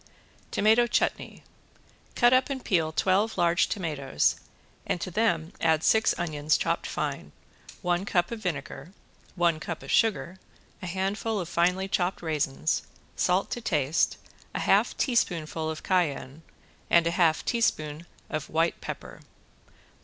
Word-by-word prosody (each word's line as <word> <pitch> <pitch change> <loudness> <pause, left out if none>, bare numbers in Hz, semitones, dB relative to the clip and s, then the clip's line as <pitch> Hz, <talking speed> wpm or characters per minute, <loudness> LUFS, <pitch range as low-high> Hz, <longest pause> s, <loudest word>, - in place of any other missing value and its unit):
~TOMATO 220 +3 +4
CHUTNEY~ - - -1 0.7
Cut 240 +1 +5
up 255 +2 +3
and 270 -2 -4
peel 165 -5 +1
twelve 195 +6 +1
large 170 0 +3
tomatoes 150 - 0 0.5
and - - -2
to 185 - -5
them 175 -5 0
add 160 -1 +2
six 220 0 +3
onions 155 -3 0
chopped - - -1
fine, - - -4 0.5
one 175 +1 +1
cup 175 -1 0
of 230 - -4
vinegar, 165 -3 -5 0.4
one 170 -3 +2
cup 165 +1 -6
of - - -6
sugar, 195 -5 +1 0.4
a 185 - -5
handful 195 +4 -2
of 175 - -4
finely 180 +3 +1
chopped 180 -2 -1
raisins, 155 -1 0 0.3
salt 185 +2 +1
to 240 - -3
taste, 150 - +1 0.4
a - - -1
half - - +2
teaspoonful 165 - 0
of 160 - -6
cayenne 160 -5 -1 0.5
and 170 -1 +5
a 170 - +1
half 170 -3 +2
teaspoonful 160 -9 -1 0.2
of 155 -1 -4
white 165 +2 0
pepper. - - -7
175 Hz, 140 wpm, -27 LUFS, 160-195 Hz, 0.7 s, Cut